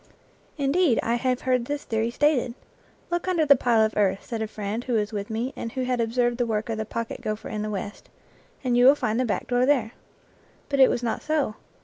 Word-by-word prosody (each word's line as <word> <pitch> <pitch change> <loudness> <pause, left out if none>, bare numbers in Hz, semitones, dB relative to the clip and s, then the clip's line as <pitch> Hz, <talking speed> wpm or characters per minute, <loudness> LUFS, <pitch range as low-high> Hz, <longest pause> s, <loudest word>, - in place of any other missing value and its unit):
Indeed, 285 -1 +2
I 230 - 0
have 250 +1 0
heard 250 -2 +1
this 290 +2 -3
theory 225 0 -1
stated. 255 -2 +1 0.3
" - - -33
Look 345 +1 -1
under 345 -4 +2
the 280 -1 +7
pile 235 -3 +3
of 220 - -3
earth," 195 -2 +1
said 230 -3 -4
a 220 - -1
friend 215 +2 -4
who 250 - -3
was 215 -1 0
with 205 0 -4
me 230 +4 -2
and 230 - -6
who 260 - -2
had 250 -1 0
observed 240 +1 0
the 245 - +2
work 215 0 -2
of 220 -1 -2
the 220 - -2
pocket 230 +1 -5
gopher 215 0 -4
in 215 -1 -3
the 215 - -3
West, 205 0 -6 0.3
" - - -32
and 250 -2 +1
you 245 +1 +6
will 275 - +8
find 220 -4 -1
the 255 - +2
back 220 - -2
door 245 0 +1
there." 255 -5 +2 0.8
But 280 -1 0
it 265 - +8
was 245 - -1
not 230 - -1
so. 300 -7 0
240 Hz, 245 wpm, -25 LUFS, 220-260 Hz, 0.8 s, will